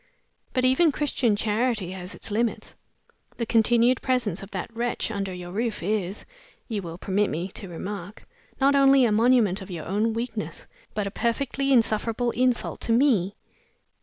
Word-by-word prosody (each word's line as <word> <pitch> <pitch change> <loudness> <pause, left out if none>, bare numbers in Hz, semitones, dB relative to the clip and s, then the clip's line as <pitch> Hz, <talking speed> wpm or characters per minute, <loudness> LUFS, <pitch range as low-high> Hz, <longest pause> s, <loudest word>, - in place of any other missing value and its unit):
But 255 0 +2
even 280 +6 +4
Christian 260 -6 +1
Charity 215 -2 0
has 185 0 -7
its - - -6
limits. 230 +2 -1 0.6
The 235 - -1
continued 235 +2 +3
presence 245 -8 0
of 195 - -9
that 205 +3 -6
wretch 235 -1 -1
under 200 -2 -3
your 180 -1 -7
roof 220 -1 -2
is, 200 0 -2 0.4
you 215 -4 -2
will 170 -2 -7
permit 200 +2 0
me 170 +5 -3
to 195 0 -8
remark, 195 +3 -7 0.3
not 280 +1 +4
only 275 -1 +6
a 225 - +2
monument 220 -3 +3
of 190 - -9
your 170 -4 -6
own 210 +5 0
weakness, 230 -2 -4 0.3
but 210 - -1
a 200 - -3
perfectly 275 +5 -1
insufferable 230 0 +2
insult 250 0 0
to - - 0
Me." 225 -7 +3
220 Hz, 165 wpm, -25 LUFS, 195-245 Hz, 0.6 s, only